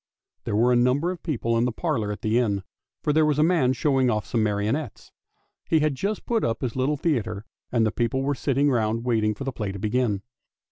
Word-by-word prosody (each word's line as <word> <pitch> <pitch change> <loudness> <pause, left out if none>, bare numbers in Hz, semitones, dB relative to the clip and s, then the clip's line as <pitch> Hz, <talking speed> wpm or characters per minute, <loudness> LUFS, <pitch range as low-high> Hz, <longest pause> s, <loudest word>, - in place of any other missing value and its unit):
There - - -1
were 120 +4 +4
a - - +4
number 130 +8 +2
of 180 - -7
people 115 -7 -1
in 120 - +2
the 125 - 0
parlour 115 -6 -1
at 105 - -7
the 110 +2 +2
inn, 100 -5 0 0.4
for 150 - +1
there 160 +1 +4
was 150 -2 +2
a 150 - +4
man 160 -7 +3
showing 135 -1 +2
off 105 -3 0
some 115 - 0
marionettes. 110 +5 -2 0.6
He 160 -2 +3
had 155 -1 +2
just 200 +10 -3
put 230 -2 0
up 115 - -1
his 125 -3 -3
little 135 +3 0
theatre, 115 -9 -1 0.3
and 115 -2 +2
the 110 - +1
people 120 +3 -1
were 145 +1 +1
sitting 140 +1 +1
round 115 -1 0
waiting 110 -3 +1
for 135 - -6
the 135 - -2
play 105 -5 -4
to 100 - -7
begin. 105 0 0
125 Hz, 230 wpm, -25 LUFS, 110-145 Hz, 0.6 s, were